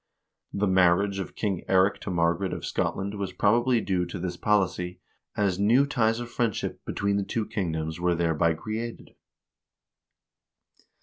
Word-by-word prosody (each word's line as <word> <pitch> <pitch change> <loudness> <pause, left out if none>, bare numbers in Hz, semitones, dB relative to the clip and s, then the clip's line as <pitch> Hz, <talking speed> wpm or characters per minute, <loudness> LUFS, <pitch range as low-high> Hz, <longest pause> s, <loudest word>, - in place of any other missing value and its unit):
The 100 +1 0
marriage 95 +1 +3
of 95 - -6
King 100 -5 -2
Eirik 95 +1 +3
to - - -6
Mar 85 -2 +2
garet 95 +2 -3
of - - -5
Scotland 100 +1 -2
was 95 -2 -3
probably 120 +6 +3
due 90 -3 0
to 85 - -6
this 90 0 -4
policy, 90 -3 0 0.4
as 100 -3 +1
new 115 +7 +4
ties 115 -5 +1
of 120 0 -6
friendship 115 -4 -2
between 100 0 0
the 100 - 0
two 110 +2 -2
kingdoms 80 -7 -3
wen 90 -1 +1
thereby 80 -1 +2
created. 110 +6 -6
95 Hz, 150 wpm, -27 LUFS, 90-110 Hz, 0.4 s, new